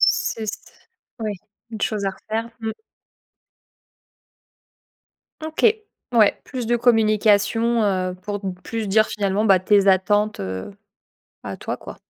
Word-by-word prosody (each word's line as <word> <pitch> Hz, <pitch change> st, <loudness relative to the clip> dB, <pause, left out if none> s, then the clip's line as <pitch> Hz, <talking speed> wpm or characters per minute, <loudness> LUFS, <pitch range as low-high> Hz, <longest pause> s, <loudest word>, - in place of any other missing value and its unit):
S -, -, +2 dB
c'est 225 Hz, -, -7 dB
s 215 Hz, -, -5 dB, 0.6 s
oui, 215 Hz, -2 st, -2 dB, 0.4 s
une 220 Hz, -, -7 dB
chose 210 Hz, -2 st, -1 dB
à -, -, +1 dB
refaire, 225 Hz, +4 st, -5 dB
mmh. 220 Hz, -1 st, -2 dB, 2.7 s
OK, 315 Hz, 0 st, 0 dB, 0.5 s
ouais, 215 Hz, -3 st, +4 dB
plus 255 Hz, -4 st, -5 dB
de 240 Hz, +1 st, +2 dB
communication, 225 Hz, 0 st, +3 dB
heu, 185 Hz, -2 st, 0 dB
pour 205 Hz, -1 st, -3 dB, 0.2 s
plus 225 Hz, -2 st, -4 dB
dire, 215 Hz, +2 st, +4 dB
finalement, 200 Hz, 0 st, -1 dB
bah, 195 Hz, -4 st, +5 dB
tes 200 Hz, +1 st, +3 dB
attentes, 205 Hz, +3 st, +2 dB
heu, 95 Hz, -, -5 dB, 0.7 s
à -, -, -6 dB
toi, -, -, -4 dB
quoi. -, -, -10 dB
215 Hz, 130 wpm, -22 LUFS, 200-225 Hz, 2.7 s, bah